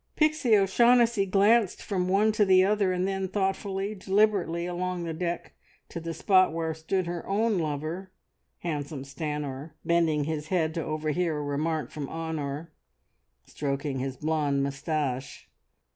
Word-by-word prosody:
Pixie 305 Hz, -8 st, +3 dB
O'Shaughnessy 235 Hz, +1 st, +4 dB
glanced 205 Hz, +2 st, +3 dB
from 185 Hz, -3 st, -1 dB
one 205 Hz, +3 st, +4 dB
to 215 Hz, 0 st, +2 dB
the 185 Hz, -2 st, +6 dB
other, 200 Hz, -1 st, +2 dB
and 180 Hz, +1 st, 0 dB
then 195 Hz, -1 st, -1 dB
thoughtfully, 195 Hz, +1 st, -1 dB
deliberately 190 Hz, -4 st, +1 dB
along 180 Hz, 0 st, -3 dB
the 165 Hz, -1 st, -3 dB
deck 170 Hz, +1 st, -3 dB, 0.4 s
to -, -, -5 dB
the 165 Hz, 0 st, -5 dB
spot 185 Hz, +2 st, +4 dB
where 160 Hz, 0 st, -2 dB
stood 170 Hz, +4 st, -1 dB
her 170 Hz, 0 st, -4 dB
own 210 Hz, 0 st, +1 dB
lover, 160 Hz, +5 st, -3 dB, 0.5 s
handsome 145 Hz, -4 st, -4 dB
Stanor, 150 Hz, 0 st, -5 dB
bending 165 Hz, -3 st, +2 dB
his 155 Hz, 0 st, -3 dB
head 160 Hz, -3 st, +1 dB
to 165 Hz, -, -2 dB
overhear 155 Hz, +1 st, -1 dB
a 150 Hz, -, -3 dB
remark 150 Hz, 0 st, -2 dB
from 145 Hz, -3 st, -5 dB
Honor, 160 Hz, -1 st, -4 dB, 0.7 s
stroking 140 Hz, -1 st, -3 dB
his 135 Hz, 0 st, -3 dB
blonde 150 Hz, -3 st, 0 dB
moustache. 140 Hz, -2 st, -3 dB
170 Hz, 145 wpm, -27 LUFS, 150-195 Hz, 0.7 s, the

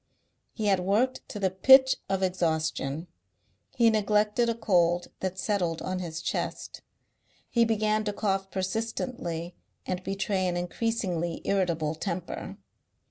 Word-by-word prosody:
He 220 Hz, -, -4 dB
had 195 Hz, -2 st, +3 dB
worked 215 Hz, +8 st, +1 dB
to 210 Hz, -, -6 dB
the 190 Hz, -2 st, +1 dB
pitch 265 Hz, +8 st, +7 dB
of 195 Hz, 0 st, 0 dB
exhaustion. 160 Hz, -4 st, -1 dB, 0.7 s
He 235 Hz, -3 st, +5 dB
neglected 210 Hz, +2 st, +2 dB
a 230 Hz, -, 0 dB
cold 175 Hz, -5 st, +2 dB
that 190 Hz, 0 st, -3 dB
settled 180 Hz, -5 st, 0 dB
on 185 Hz, 0 st, -2 dB
his 165 Hz, -2 st, -5 dB
chest. -, -, -3 dB, 0.7 s
He 235 Hz, -1 st, +4 dB
began 215 Hz, -1 st, +1 dB
to 210 Hz, -, 0 dB
cough 195 Hz, -2 st, -1 dB
persistently 190 Hz, -3 st, -3 dB, 0.3 s
and 185 Hz, 0 st, -3 dB
betray 195 Hz, -1 st, -1 dB
an 175 Hz, -1 st, -1 dB
increasingly 175 Hz, -3 st, -2 dB
irritable 170 Hz, -6 st, +1 dB
temper. 175 Hz, +1 st, -5 dB
190 Hz, 130 wpm, -28 LUFS, 175-215 Hz, 0.7 s, pitch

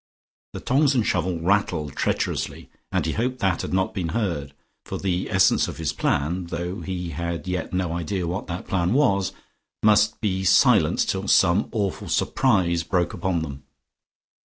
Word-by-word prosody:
The -, -, -5 dB
tongs 140 Hz, +2 st, +2 dB
and 120 Hz, -4 st, +2 dB
shovel 90 Hz, -1 st, 0 dB
rattled 85 Hz, -5 st, 0 dB
treacherously, -, -, -2 dB, 0.2 s
and -, -, 0 dB
he -, -, 0 dB
hoped 125 Hz, +3 st, -1 dB
that 95 Hz, -7 st, 0 dB
had -, -, -5 dB
not 95 Hz, 0 st, 0 dB
been 95 Hz, -5 st, -2 dB
heard, 75 Hz, -10 st, -2 dB, 0.3 s
for -, -, -5 dB
the 90 Hz, -2 st, -2 dB
essence 95 Hz, -1 st, +3 dB
of -, -, -7 dB
his 80 Hz, -1 st, -2 dB
plan 80 Hz, +4 st, -1 dB
(though 90 Hz, +2 st, -4 dB
he 90 Hz, -2 st, -4 dB
had 85 Hz, +1 st, -4 dB
yet 90 Hz, -2 st, -3 dB
no 90 Hz, -2 st, -1 dB
idea 85 Hz, +2 st, -2 dB
what 90 Hz, +4 st, -4 dB
that 85 Hz, 0 st, -5 dB
plan 90 Hz, +1 st, +1 dB
was) 100 Hz, -, +2 dB, 0.5 s
must 105 Hz, 0 st, +4 dB
be 95 Hz, -3 st, -1 dB
silence 95 Hz, 0 st, +4 dB
till 95 Hz, +1 st, -2 dB
some 95 Hz, +3 st, +4 dB
awful 100 Hz, -5 st, -2 dB
surprise 95 Hz, -10 st, +2 dB
broke 90 Hz, 0 st, 0 dB
upon 90 Hz, -4 st, -1 dB
them. 70 Hz, -3 st, -7 dB
90 Hz, 165 wpm, -24 LUFS, 85-100 Hz, 0.5 s, must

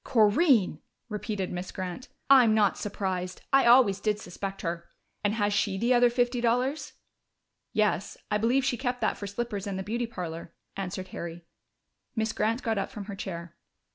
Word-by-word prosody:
"Corinne!" 220 Hz, -, +4 dB, 0.3 s
repeated 210 Hz, -2 st, -3 dB
Miss 180 Hz, +1 st, -5 dB
Grant. 185 Hz, +6 st, -5 dB, 0.2 s
"I'm 250 Hz, -5 st, +7 dB
not 210 Hz, -3 st, +3 dB
surprised. 185 Hz, -3 st, -3 dB
I 270 Hz, -2 st, +6 dB
always 235 Hz, -5 st, +6 dB
did 210 Hz, 0 st, 0 dB
suspect 195 Hz, +2 st, -6 dB
her.... 170 Hz, 0 st, -4 dB, 0.3 s
And 205 Hz, +1 st, +1 dB
has 205 Hz, -2 st, +1 dB
she 200 Hz, -1 st, +1 dB
the 235 Hz, +5 st, +2 dB
other 245 Hz, 0 st, +5 dB
fifty 245 Hz, 0 st, +1 dB
dollars?" 250 Hz, +5 st, 0 dB, 0.8 s
"Yes, 210 Hz, -3 st, 0 dB
I 210 Hz, -, +2 dB
believe 250 Hz, +5 st, +2 dB
she 245 Hz, -, +1 dB
kept 250 Hz, -1 st, -2 dB
that -, -, +1 dB
for 200 Hz, -, -6 dB
slippers 205 Hz, -1 st, -4 dB
and 195 Hz, -1 st, -3 dB
the 190 Hz, -, -3 dB
beauty 235 Hz, +4 st, -2 dB
parlor," 170 Hz, -6 st, -6 dB, 0.2 s
answered 185 Hz, -1 st, -5 dB
Harry. 170 Hz, 0 st, -7 dB, 0.7 s
Miss 220 Hz, -1 st, 0 dB
Grant 225 Hz, +4 st, 0 dB
got 225 Hz, -3 st, 0 dB
up 195 Hz, -, -2 dB
from 205 Hz, -2 st, -7 dB
her 200 Hz, -1 st, -6 dB
chair. 170 Hz, -3 st, -6 dB
210 Hz, 170 wpm, -28 LUFS, 190-240 Hz, 0.8 s, I'm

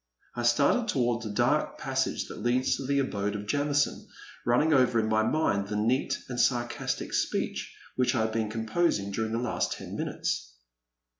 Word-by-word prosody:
I 120 Hz, -, -3 dB
started 140 Hz, -, +3 dB
toward 120 Hz, -, +1 dB
the 110 Hz, -, -5 dB
dark 120 Hz, +8 st, +1 dB
passage 130 Hz, 0 st, -1 dB
that -, -, -8 dB
leads 125 Hz, +2 st, +2 dB
to 135 Hz, -, -5 dB
the 140 Hz, 0 st, +1 dB
abode 105 Hz, -7 st, -1 dB
of 105 Hz, 0 st, -5 dB
Jamison, 145 Hz, +4 st, 0 dB, 0.4 s
running 150 Hz, +7 st, +4 dB
over 125 Hz, -4 st, +4 dB
in 110 Hz, -, +1 dB
my 110 Hz, 0 st, +3 dB
mind 110 Hz, -6 st, +1 dB
the 105 Hz, -, -3 dB
neat 115 Hz, +6 st, +1 dB
and 125 Hz, -1 st, -4 dB
sarcastic 120 Hz, -1 st, 0 dB
speech -, -, -1 dB, 0.2 s
which 130 Hz, 0 st, +2 dB
I 115 Hz, -, +2 dB
had 110 Hz, 0 st, 0 dB
been 110 Hz, -1 st, -1 dB
composing 110 Hz, -, 0 dB
during 110 Hz, +2 st, -2 dB
the 115 Hz, -, 0 dB
last 120 Hz, 0 st, -1 dB
ten -, -, -8 dB
minutes. -, -, -3 dB
120 Hz, 175 wpm, -28 LUFS, 110-135 Hz, 0.4 s, running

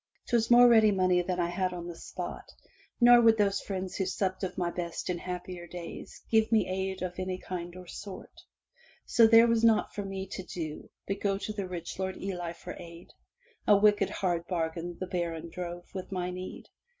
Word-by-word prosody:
*Twas 230 Hz, -2 st, +2 dB
more 245 Hz, 0 st, +8 dB
ready 220 Hz, -2 st, +6 dB
money 185 Hz, -2 st, +3 dB
than 180 Hz, 0 st, -2 dB
I 170 Hz, -1 st, +1 dB
had 185 Hz, +1 st, -1 dB
on 175 Hz, -1 st, -6 dB
the 175 Hz, -1 st, -6 dB
spot, -, -, -7 dB, 0.5 s
nor 240 Hz, 0 st, +8 dB
would 225 Hz, -1 st, +6 dB
those 200 Hz, -2 st, +2 dB
friends 190 Hz, -2 st, -4 dB
who 190 Hz, -, 0 dB
supped 190 Hz, 0 st, -1 dB
of 185 Hz, -, -3 dB
my 175 Hz, -1 st, 0 dB
best 170 Hz, 0 st, -3 dB
in 175 Hz, -, -3 dB
happier 180 Hz, -1 st, -6 dB
days 175 Hz, -1 st, -9 dB
give 220 Hz, 0 st, +3 dB
me 220 Hz, -2 st, +3 dB
aid 190 Hz, 0 st, -2 dB
of 180 Hz, 0 st, -4 dB
any 185 Hz, 0 st, -2 dB
kind 175 Hz, -1 st, -6 dB
or 185 Hz, 0 st, -10 dB
sort. 190 Hz, +2 st, -9 dB, 0.7 s
So 230 Hz, -, +5 dB
was -, -, +5 dB
there 230 Hz, +1 st, +8 dB
naught 230 Hz, -1 st, +3 dB
for 205 Hz, -, -3 dB
me 195 Hz, -1 st, -4 dB
to 190 Hz, -, -6 dB
do 165 Hz, -4 st, -6 dB, 0.2 s
but 195 Hz, -, -3 dB
go 195 Hz, -1 st, +1 dB
to 215 Hz, +2 st, -4 dB
the 200 Hz, -3 st, -4 dB
rich 175 Hz, 0 st, -6 dB
Lord 190 Hz, 0 st, -2 dB
of -, -, -10 dB
Ely 175 Hz, -3 st, -3 dB
for 180 Hz, +1 st, -9 dB
aid. 170 Hz, 0 st, -11 dB, 0.6 s
A 205 Hz, -, +7 dB
wicked 205 Hz, -1 st, +4 dB
hard 175 Hz, -3 st, -1 dB
bargain 170 Hz, 0 st, -3 dB
the 185 Hz, -, -2 dB
baron 170 Hz, -2 st, -3 dB
drove 175 Hz, 0 st, -6 dB
with 190 Hz, -1 st, -6 dB
my 180 Hz, -1 st, -2 dB
need. 185 Hz, +1 st, -7 dB
185 Hz, 205 wpm, -29 LUFS, 175-200 Hz, 0.7 s, more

